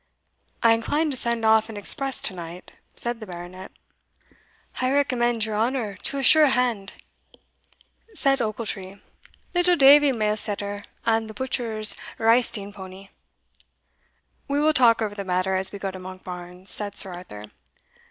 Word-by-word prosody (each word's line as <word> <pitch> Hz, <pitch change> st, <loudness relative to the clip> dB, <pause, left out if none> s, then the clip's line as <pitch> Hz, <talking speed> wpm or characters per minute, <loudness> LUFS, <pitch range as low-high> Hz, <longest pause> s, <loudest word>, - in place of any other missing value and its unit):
"I 230 Hz, -1 st, +6 dB
incline 295 Hz, +7 st, 0 dB
to -, -, -2 dB
send 235 Hz, -2 st, -1 dB
off 220 Hz, 0 st, +4 dB
an 220 Hz, -, -7 dB
express 270 Hz, +6 st, +2 dB
to 195 Hz, -, +1 dB
night," 175 Hz, 0 st, -9 dB, 0.2 s
said 240 Hz, -1 st, 0 dB
the 215 Hz, -, -9 dB
Baronet. 180 Hz, +1 st, -9 dB, 1.1 s
"I -, -, -5 dB
can 260 Hz, -, +1 dB
recommend 240 Hz, -5 st, +1 dB
your 215 Hz, -1 st, -4 dB
honour 225 Hz, -1 st, -1 dB
to 280 Hz, -, -2 dB
a 275 Hz, -, -2 dB
sure 305 Hz, +3 st, +7 dB
hand," 240 Hz, -7 st, 0 dB, 1.2 s
said 275 Hz, -6 st, +2 dB
Ochiltree; 205 Hz, -3 st, -4 dB, 0.5 s
"little 355 Hz, 0 st, +3 dB
Davie 285 Hz, -1 st, +7 dB
Mailsetter, 210 Hz, -3 st, -2 dB, 0.2 s
and 225 Hz, -1 st, +1 dB
the 215 Hz, -, -10 dB
butcher's 225 Hz, -4 st, -2 dB, 0.2 s
reisting 225 Hz, -3 st, +2 dB
powny." 190 Hz, 0 st, -11 dB, 1.4 s
"We 280 Hz, +1 st, 0 dB
will 310 Hz, +1 st, +3 dB
talk 235 Hz, -5 st, +5 dB
over 210 Hz, -1 st, -3 dB
the 200 Hz, -1 st, -5 dB
matter 185 Hz, 0 st, 0 dB
as 190 Hz, 0 st, +1 dB
we 200 Hz, -, -7 dB
go 195 Hz, -1 st, -4 dB
to 185 Hz, -, -9 dB
Monkbarns," 180 Hz, 0 st, -9 dB
said 205 Hz, -1 st, -5 dB
Sir 190 Hz, -2 st, 0 dB
Arthur. 105 Hz, -, -9 dB
220 Hz, 150 wpm, -24 LUFS, 190-250 Hz, 1.4 s, sure